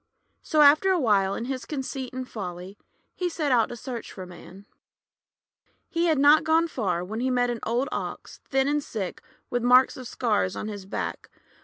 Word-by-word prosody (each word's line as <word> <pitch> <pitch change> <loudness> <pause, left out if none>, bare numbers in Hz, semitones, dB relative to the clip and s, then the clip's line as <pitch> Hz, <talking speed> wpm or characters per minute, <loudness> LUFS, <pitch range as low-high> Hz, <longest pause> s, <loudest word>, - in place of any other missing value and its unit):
So 310 -2 +2
after 300 +6 +6
a 370 -2 +3
while, 200 -7 +2
in 230 - -4
his 260 0 -4
conceit 265 -3 -5
and 255 0 -5
folly, 185 -3 -7 0.4
he 360 -1 -2
set 310 -4 -1
out 235 -3 +3
to - - -6
search 235 0 -6
for 185 - -8
Man. 185 +2 -13 1.2
He 335 +1 0
had 315 -3 +3
not 290 +3 +6
gone 325 +1 +3
far 190 - -2
when 215 +4 -5
he 255 +2 0
met 245 -1 +1
an 235 - -4
old 240 +4 0
Ox, - - -6
thin 270 0 +2
and 295 0 0
sick, 200 -8 -5 0.3
with 245 - 0
marks 250 +2 +5
of 255 -2 -7
scars 210 -7 0
on 215 - -4
his 200 -2 -8
back. - - -4
250 Hz, 190 wpm, -26 LUFS, 210-285 Hz, 1.2 s, after